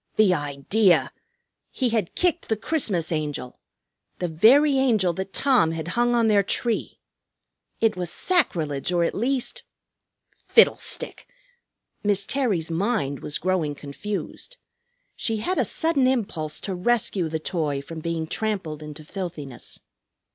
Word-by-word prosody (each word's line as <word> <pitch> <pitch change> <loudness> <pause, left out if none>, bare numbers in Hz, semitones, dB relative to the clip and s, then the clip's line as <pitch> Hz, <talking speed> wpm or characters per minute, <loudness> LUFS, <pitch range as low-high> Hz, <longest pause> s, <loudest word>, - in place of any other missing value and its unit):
The 210 -4 +5
idea! 145 +2 +2 0.6
He 255 -3 -1
had 220 -6 -1
kicked 350 -1 0
the 220 - +1
Christmas 210 - 0
Angel, 150 -5 -3 0.6
the 180 - -2
very 265 - +5
Angel 215 -9 +2
that 190 +3 -5
Tom 250 - +3
had 165 +1 -4
hung 240 +4 +2
on 230 -1 +3
their 210 -2 +5
tree! 225 +4 -1 0.8
It 225 -3 +3
was 180 -2 -3
sacrilege, 165 - 0
or 175 -1 +2
at - - 0
least 265 - -1 0.7
Fiddlestick! 465 - +2 0.8
Miss 200 -1 +2
Terry's 200 - 0
mind 170 - -1
was 150 - -2
growing 175 -6 0
confused. 200 - -6 0.6
She 225 -1 -1
had 360 - -1
a - - +4
sudden 320 -6 +1
impulse 195 -12 -1
to 195 - -3
rescue 195 -3 +1
the 160 - -1
toy 155 -3 -2
from 160 +4 -8
being 165 0 -2
trampled 180 -5 -2
into 150 0 -9
filthiness. 155 - -6
190 Hz, 135 wpm, -24 LUFS, 160-235 Hz, 0.8 s, The